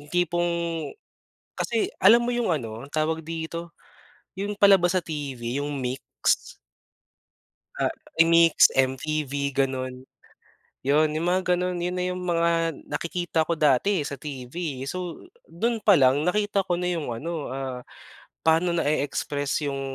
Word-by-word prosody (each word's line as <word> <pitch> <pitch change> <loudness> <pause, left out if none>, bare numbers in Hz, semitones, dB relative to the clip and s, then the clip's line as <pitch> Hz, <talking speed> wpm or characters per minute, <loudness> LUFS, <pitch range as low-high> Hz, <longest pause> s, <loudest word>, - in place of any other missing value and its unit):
yung 145 - -15
tipong 175 +1 +1 1.0
kasi 230 -2 -1
alam 230 +5 +7
mo 240 - -1
yung 240 -1 0
ano 120 -6 -3
tawag 155 +2 -1
dito? 165 +1 -5 0.6
Yung 200 +2 -4
palabas 190 -3 +5
sa - - +1
TV 135 -4 -4
yung 145 0 -3
Mix? 130 +1 -2 1.2
Ah, - - 0 0.2
eh, 165 - +7
Mix, 165 0 +6
MTV 140 +1 0
ganun. 130 -1 -2 0.8
Yun 150 +3 +4
yung 165 - -2
mga 185 +1 +2
ganon 180 0 0
yun 180 +1 -1
na 180 - 0
yung 180 - -6
mga 170 -1 +1 0.2
nakikita 170 +2 -1
ko 170 - -2
dati 155 +7 +3
eh - - -3
sa - - -5
TV 130 -2 -8 0.3
eh. 135 - -4
So 180 +1 -5 0.3
dun 225 +6 -2
palang 145 -8 +5
nakita 205 +2 +1
ko 175 -1 -1
na 180 - -1
yung 165 -8 -2
ano, 155 +5 -4
ah, 130 -2 -4 0.6
paano 165 +2 +3
na-e-express 145 -1 -1
yung, 135 - -4
160 Hz, 140 wpm, -25 LUFS, 140-180 Hz, 1.2 s, alam